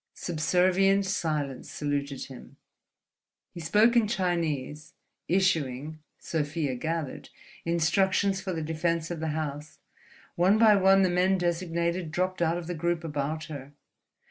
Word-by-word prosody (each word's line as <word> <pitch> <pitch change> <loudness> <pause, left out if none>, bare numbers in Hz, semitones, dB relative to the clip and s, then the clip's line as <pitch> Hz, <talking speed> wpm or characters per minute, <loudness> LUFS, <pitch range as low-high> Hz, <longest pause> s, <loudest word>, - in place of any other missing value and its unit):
Subservient 185 +4 +2
silence 155 -8 -2
saluted 140 -1 -3
him. 130 -2 -13 0.9
He - - -9
spoke 210 +8 +3
in 230 -3 +4
Chinese, 160 - -2 0.3
issuing 155 -5 0 0.2
(Sofia 150 -2 -2
gathered) 160 +2 -4 0.4
instructions 190 +4 +2
for 190 - -4
the 165 -3 -3
defense 165 +1 -1
of 170 - -4
the 160 - -2
house. 150 -1 -5 0.6
One 185 +5 +4
by 220 -2 +6
one 195 0 +5
the 185 - +2
men 185 +2 +3
designated 170 -1 -1
dropped 185 +2 -1
out 170 0 +2
of 175 - -6
the 175 - -4
group 170 0 -1
about 150 0 -3
her. 145 -2 -8
170 Hz, 130 wpm, -28 LUFS, 155-185 Hz, 0.9 s, by